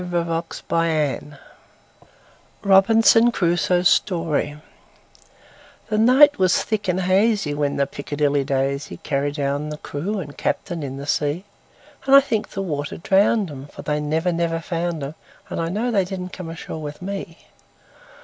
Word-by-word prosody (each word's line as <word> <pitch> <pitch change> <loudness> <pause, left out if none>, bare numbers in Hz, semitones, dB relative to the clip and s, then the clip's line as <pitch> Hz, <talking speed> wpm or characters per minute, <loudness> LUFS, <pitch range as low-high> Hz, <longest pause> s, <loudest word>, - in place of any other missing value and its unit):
Carryl1841–1920 165 -4 -2 1.2
Robinson 225 +4 +5
Crusoe's 175 -1 +2
Story 160 -5 +1 1.3
THE 215 0 +1
NIGHT 265 +5 +6
was 185 -1 +3
thick 210 -2 -2
and 180 +1 +1
hazyWhen 185 -7 +1
the 140 - +2
"Piccadilly 145 0 -1
Daisy"Carried 140 +1 -2
down 145 +1 -2
the 150 - -5
crew 170 +8 -4
and 145 -7 -6
captain 170 -2 -2
in 135 -2 -5
the 140 - -6
sea; 150 +5 -1 0.6
And 275 - +7
I - - +11
think 230 -6 -2
the 195 - -4
water 145 -5 -4
drowned 195 +1 +2
'em; 135 0 -9
For - - -11
they 150 0 -1
never, 160 +4 0
never 165 -1 -1
found 170 -2 -3
'em, 140 +2 -5 0.4
And - - -2
I 165 - -2
know 220 +7 -1
they 200 -4 +2
didn't 185 0 -6
come 180 -3 -7
ashore 165 -1 -7
with 150 +3 -7
me. 195 -3 -5
165 Hz, 140 wpm, -22 LUFS, 145-195 Hz, 1.3 s, I